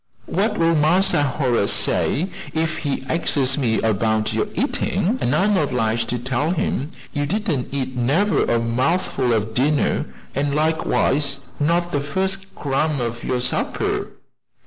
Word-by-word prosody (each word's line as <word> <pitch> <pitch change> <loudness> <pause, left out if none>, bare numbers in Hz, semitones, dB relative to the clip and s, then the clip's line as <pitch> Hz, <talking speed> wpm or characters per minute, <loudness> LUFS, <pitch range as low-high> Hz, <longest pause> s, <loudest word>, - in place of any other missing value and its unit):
"What - - 0
will 165 0 +3
Massa 175 +2 +4
Horace 125 -6 +1
say 180 +6 +2 0.3
if 160 -1 0
he 140 -3 -3
axes 135 -4 +2
me 115 -6 +1
'bout 110 0 0
your - - 0
eatin' 200 +7 0
an' 125 - +1
I'm 200 +6 +3
'bliged 120 - 0
to 125 - -1
tell 130 +5 -1
him 155 -4 -1 0.2
you 145 -2 -1
didn't 170 - -1
eat 130 -2 -3
never 145 - +2
a 120 - +1
mouthful 125 +2 0
of 110 -1 0
dinner, 145 +5 +1 0.3
an' 140 +1 -1
likewise 150 -2 +1 0.2
not 170 +3 +1
the 145 - 0
first 190 +6 -2
crumb 145 +1 -1
of 120 -1 -3
your 125 - -1
supper?" - - 0
145 Hz, 145 wpm, -21 LUFS, 125-165 Hz, 0.3 s, Massa